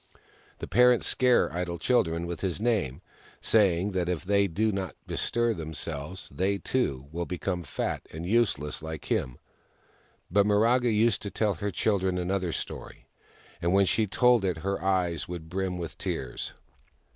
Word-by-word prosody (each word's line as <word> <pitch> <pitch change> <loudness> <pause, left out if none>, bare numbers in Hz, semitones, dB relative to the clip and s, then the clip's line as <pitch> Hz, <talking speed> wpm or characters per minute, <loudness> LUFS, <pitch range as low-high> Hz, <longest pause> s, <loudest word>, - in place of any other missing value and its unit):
The - - -6
parents 125 +3 +5
scare 125 -1 +3
idle 85 0 -2
children 85 -5 +1
with 85 0 -5
his 95 -2 -1
name, 105 - 0 0.4
saying 100 -3 +3
that 90 -2 -1
if 90 0 -2
they 100 +1 +3
do 110 +5 +1
not 95 -6 -3
bestir 120 0 0
themselves 80 0 -6
they, 100 +2 0
too, 70 - -1
will 85 +1 -3
become 90 0 -2
fat - - -3
and 80 +2 -6
useless 100 -8 +1
like 80 0 -7
him. 65 -2 0 0.9
But 100 +2 +4
Miraga 115 +4 +3
used 110 -1 +2
to 100 - -4
tell 105 0 0
her 105 +1 -3
children 95 -1 0
another 90 0 -1
story, - - -6 0.6
and 85 +2 +1
when 100 0 +5
she 110 +3 +2
told 120 +2 +4
it 90 -4 0
her 100 0 -1
eyes 90 -4 0
would 85 -2 -7
brim 95 0 -2
with 85 -2 -6
tears. 65 -2 -4
95 Hz, 155 wpm, -28 LUFS, 85-105 Hz, 0.9 s, parents